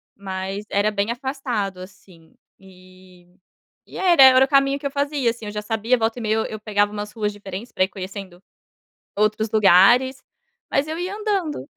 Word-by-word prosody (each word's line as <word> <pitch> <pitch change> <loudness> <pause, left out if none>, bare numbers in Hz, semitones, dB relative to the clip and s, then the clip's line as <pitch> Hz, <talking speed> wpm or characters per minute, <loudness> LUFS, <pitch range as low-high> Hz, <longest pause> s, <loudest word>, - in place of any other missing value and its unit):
mas 195 +1 -6
era 205 +2 +1
bem 205 +1 -2
afastado, 240 -7 -4
assim, 185 -3 -15 0.2
e 185 -1 -19 0.6
e - - -11
era 350 -7 +5
era 260 0 +8
o - - -10
caminho 275 0 +2
que 280 - -3
eu - - -4
fazia, 280 -3 0
assim, 230 -1 -6
eu 210 - -5
já 210 0 -4
sabia. 225 +3 0
Volta 225 0 -1
e - - -5
meia 215 - 0
eu 220 - 0
eu 215 - -7
pegava 205 -1 0
umas 210 0 -6
ruas 210 -2 -2
diferentes, 205 +2 -9
para - - +1
ir - - +1
conhecendo, 190 -2 -9 0.8
outros 215 +1 0
lugares, 220 +6 +4 0.5
mas 275 +2 +1
eu 320 +2 -5
ia 365 +3 -4
andando. 390 -10 -2
215 Hz, 185 wpm, -22 LUFS, 195-265 Hz, 0.8 s, era